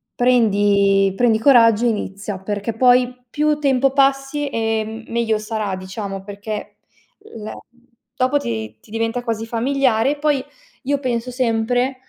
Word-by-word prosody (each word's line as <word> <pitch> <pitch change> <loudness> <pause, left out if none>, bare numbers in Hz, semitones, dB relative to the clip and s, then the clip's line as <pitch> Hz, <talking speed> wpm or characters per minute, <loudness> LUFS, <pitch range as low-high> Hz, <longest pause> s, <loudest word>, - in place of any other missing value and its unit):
prendi 205 -5 +3
prendi 225 -2 +2
coraggio 230 -3 +5
e - - +4
inizia. 200 -2 -4
Perché 205 +3 -3
poi, 250 +1 +2
più 300 +2 +1
tempo 270 -2 +2
passi 275 +1 +1
e 225 -2 -1 0.2
m - - -13
meglio 230 -2 +1
sarà, 215 -3 -3
diciamo, 195 +1 -6
perché 205 +1 -7 0.6
le 215 -1 -7 0.6
dopo 255 +3 +2
ti 110 - -4
ti 210 - -20
diventa 225 +2 -2
quasi 225 -2 -3
familiare 245 +1 +1
e - - -2
poi 290 -2 +1 0.4
io 280 +1 0
penso 250 -2 -2
sempre 245 +1 0
230 Hz, 140 wpm, -20 LUFS, 210-255 Hz, 0.6 s, coraggio